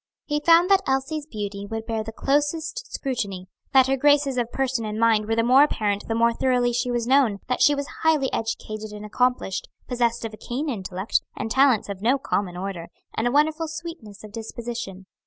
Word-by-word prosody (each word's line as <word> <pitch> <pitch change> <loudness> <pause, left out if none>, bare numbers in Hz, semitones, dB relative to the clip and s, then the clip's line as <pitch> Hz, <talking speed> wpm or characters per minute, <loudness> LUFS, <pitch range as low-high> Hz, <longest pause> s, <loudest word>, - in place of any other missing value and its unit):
He 295 0 0
found 335 +4 +5
that 390 -1 +6
Elsie's 275 +3 -1
beauty 205 -5 -5
would 225 +1 -5
bear 225 -1 -2
the 225 - -7
closest 310 - -1
scrutiny, 200 -9 -3 0.2
that 265 -1 +6
her 270 +1 +1
graces 285 -1 +3
of 240 -1 -1
person 260 -3 -1
and 215 0 -4
mind 225 -2 +3
were 225 - +1
the 230 - +2
more 255 +4 +6
apparent 210 -8 +1
the 225 - -1
more 235 0 +3
thoroughly 245 -1 +1
she 245 +1 0
was 240 -1 -1
known; 255 -5 +3
that 250 - -1
she 290 - +6
was 280 0 -3 0.2
highly 310 -5 +2
educated 215 -1 -4
and 210 0 -8
accomplished, 245 -3 0 0.2
possessed 235 -2 0
of 225 - -5
a - - -9
keen 275 +8 -4
intellect, 190 -3 -1 0.2
and 225 - -4
talents 265 -4 +4
of 200 -2 -6
no 245 +6 +3
common 195 -9 -2
order, 185 -3 -5 0.3
and 225 - 0
a - - +1
wonderful 310 +3 +2
sweetness 315 - -8
of 215 - -10
disposition. 225 -3 -6
240 Hz, 200 wpm, -24 LUFS, 215-275 Hz, 0.3 s, that